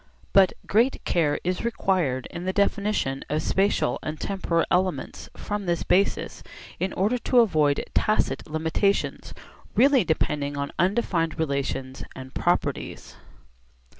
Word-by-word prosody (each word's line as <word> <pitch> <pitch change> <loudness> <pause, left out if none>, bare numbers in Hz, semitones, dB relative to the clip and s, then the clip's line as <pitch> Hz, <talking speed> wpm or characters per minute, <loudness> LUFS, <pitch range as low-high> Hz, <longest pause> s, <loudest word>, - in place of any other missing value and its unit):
But 195 -2 +6
great 235 +6 +2
care 150 -4 +1
is 180 +1 -2
required 185 - 0
in 175 +1 -6
the 185 - -1
definition 200 -9 0
of 155 +1 -1
spatial 195 +1 +1
and 155 0 -5
temporal 175 -4 0
elements 185 0 -1
from 205 -2 -4
this 170 -1 0
basis 195 +2 +1 0.4
in 190 - -1
order 215 +7 +1
to 245 +1 +4
avoid 155 -9 +2
tacit 215 -6 0
limitations 160 +6 0 0.4
really 270 -1 +5
depending 145 -3 -1
on 140 0 -3
undefined 180 -4 +1
relations 140 -3 -2
and 130 0 -9
properties. - - -2
180 Hz, 125 wpm, -25 LUFS, 150-200 Hz, 0.4 s, But